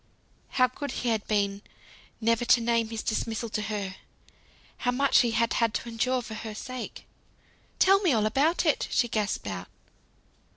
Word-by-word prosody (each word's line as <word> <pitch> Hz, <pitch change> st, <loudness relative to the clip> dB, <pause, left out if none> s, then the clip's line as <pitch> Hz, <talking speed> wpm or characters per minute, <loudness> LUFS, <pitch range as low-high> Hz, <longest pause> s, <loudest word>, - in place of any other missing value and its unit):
How 255 Hz, -, +7 dB
good 285 Hz, +3 st, -6 dB
he 245 Hz, -, -2 dB
had 220 Hz, -2 st, -1 dB
been 200 Hz, -1 st, 0 dB, 0.6 s
never 230 Hz, +1 st, +2 dB
to 245 Hz, 0 st, +5 dB
name 230 Hz, -1 st, +1 dB
his 225 Hz, -1 st, -4 dB
dismissal 225 Hz, +1 st, -2 dB
to 215 Hz, -, -2 dB
her. 200 Hz, -3 st, -4 dB, 0.8 s
How 245 Hz, -, -1 dB
much 270 Hz, +2 st, +4 dB
he 240 Hz, -, +3 dB
had 230 Hz, 0 st, +1 dB
had 230 Hz, -2 st, +1 dB
to 235 Hz, -, -3 dB
endure 250 Hz, +2 st, 0 dB
for 220 Hz, -, -8 dB
her 215 Hz, 0 st, -6 dB
sake! 255 Hz, +3 st, -7 dB, 0.7 s
"Tell 390 Hz, +1 st, +5 dB
me 370 Hz, -6 st, +2 dB
all 220 Hz, -4 st, +2 dB
about 290 Hz, +11 st, +2 dB
it," 305 Hz, -, +2 dB
she 240 Hz, -, +2 dB
gasped 215 Hz, -3 st, -1 dB
out. 90 Hz, -3 st, -5 dB
230 Hz, 170 wpm, -27 LUFS, 215-250 Hz, 0.8 s, How